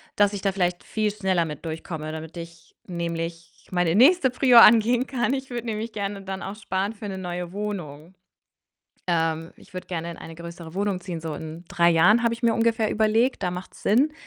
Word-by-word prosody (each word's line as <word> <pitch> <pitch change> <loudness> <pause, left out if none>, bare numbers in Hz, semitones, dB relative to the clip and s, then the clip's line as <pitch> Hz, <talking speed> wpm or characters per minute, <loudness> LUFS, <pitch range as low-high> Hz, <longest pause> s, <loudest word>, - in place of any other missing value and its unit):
dass 205 0 +3
ich 200 - -4
da 195 -1 +1
vielleicht 180 -2 -1
viel 215 -1 -1
schneller 190 -5 0
mit 150 -2 -7
durchkomme, 160 -1 -5
damit 160 +1 -8
ich 170 0 -11
nämlich 170 -1 -5
meine 175 -2 +1
nächste 265 - +5
Prio 250 -2 +5
angehen 235 +2 +7
kann. 260 -1 0
Ich 265 0 -6
würde 240 -1 -4
nämlich 220 +1 -3
gerne 200 -1 -4
dann 190 0 -5
auch 195 - -5
sparen 200 0 -2
für 210 - -10
'ne 190 -1 -5
neue 180 -1 -5
Wohnung. 180 -5 -6 0.9
Ähm, 165 -1 0
ich - - -19
würde 185 - -6
gerne 170 -1 -4
in - - -11
eine 165 - -9
größere 170 -1 -9
Wohnung 200 -1 -1
ziehen, 175 -3 -6
so 160 -2 -5
in 160 +2 -8
3 170 0 +3
Jahren 210 +8 +5
habe 235 -1 +2
ich 235 - -13
mir 230 -1 +4
ungefähr 225 -1 +1
überlegt, 220 +2 +2
da 180 - 0
macht's 180 +1 -8
Sinn. 270 +9 +3
190 Hz, 200 wpm, -24 LUFS, 170-220 Hz, 0.9 s, angehen